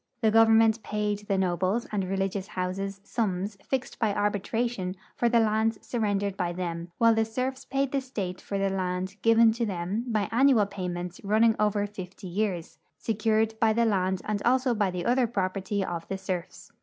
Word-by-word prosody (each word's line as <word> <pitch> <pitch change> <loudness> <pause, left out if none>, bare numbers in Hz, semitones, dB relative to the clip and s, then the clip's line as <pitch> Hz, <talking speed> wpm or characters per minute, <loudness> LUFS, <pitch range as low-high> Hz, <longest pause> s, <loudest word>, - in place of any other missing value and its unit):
The 220 -2 +4
government 225 0 +5
paid 210 -1 -2
the 195 - +1
nobles 185 +4 0
and 205 -2 0
religious 195 0 -2
houses 195 +2 -3
sums 200 -2 -2
fixed 265 -1 -3
by 215 -3 +1
arbitration 205 -1 -1 0.2
for 240 - +2
the 235 0 +4
lands 220 0 +2
surren 210 -4 -1
dered 200 -1 -2
by 175 -3 -2
them, 170 -1 -4
while 230 -1 +5
the 225 0 +2
serfs 255 +4 -3
paid 275 0 -1
the 275 - 0
state 200 -8 -5
for 200 - -4
the 195 0 +1
land 185 +1 -2
given 230 0 +6
to 230 +2 -2
them 195 +2 -2
by 215 -4 0
annual 245 -2 +5
payments 180 -2 -5
running 220 +2 +4
over 210 -1 +2
fifty 195 -1 -9
years, 185 -2 -3 0.2
secured 220 0 +1
by 220 -1 +4
the 235 +1 +2
land 190 -3 0
and 210 -1 -1
also 255 +1 +3
by 205 -3 +1
the 180 -1 -4
other 250 0 +3
property 195 -1 -1
of 170 -1 -5
the 195 - -3
serfs. 185 -2 -5
205 Hz, 180 wpm, -27 LUFS, 185-225 Hz, 0.2 s, given